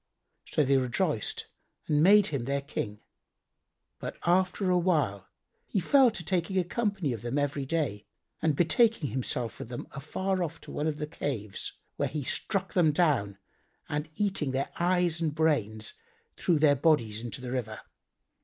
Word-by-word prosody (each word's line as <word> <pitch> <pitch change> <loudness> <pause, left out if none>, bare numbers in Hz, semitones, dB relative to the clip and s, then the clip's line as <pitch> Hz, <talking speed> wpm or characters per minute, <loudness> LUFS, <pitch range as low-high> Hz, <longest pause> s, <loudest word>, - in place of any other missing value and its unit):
So 150 - +1
they 135 0 +3
rejoiced 130 - -1 0.4
and 150 -1 +2
made 200 +4 +7
him 130 -4 -1
their 140 +1 -1
King. 105 -6 -4 1.0
But - - -6
after 185 +2 +2
awhile, 155 - +1 0.4
he 200 - 0
fell 265 +8 +5
to 210 -6 -6
taking 185 +2 0
a 185 - +4
company 195 - -1
of 115 - -6
them 120 +4 -2
every 145 -1 -1
day 140 -10 -1 0.3
and 155 -2 +2
betaking 175 - +3
himself 125 -2 -2
with - - -7
them 120 - -6
afar 185 +7 -2
off 165 -2 -3
to - - -11
one 150 - -1
of 155 -2 -1
the 150 - -2
caves, 125 -9 -4 0.2
where - - 0
he 150 -2 -3
struck 190 +7 -1
them 170 -4 +4
down 140 - +1 0.5
and 150 +1 -3
eating 190 -10 0
their 135 +1 -1
eyes 175 -1 +2
and 155 -3 0
brains, 110 -9 +1 0.4
threw 170 - +2
their 145 -1 +5
bodies 125 -8 +2
into 120 -2 -4
the 125 -1 -6
river. 115 -4 -3
150 Hz, 165 wpm, -29 LUFS, 125-175 Hz, 1.0 s, made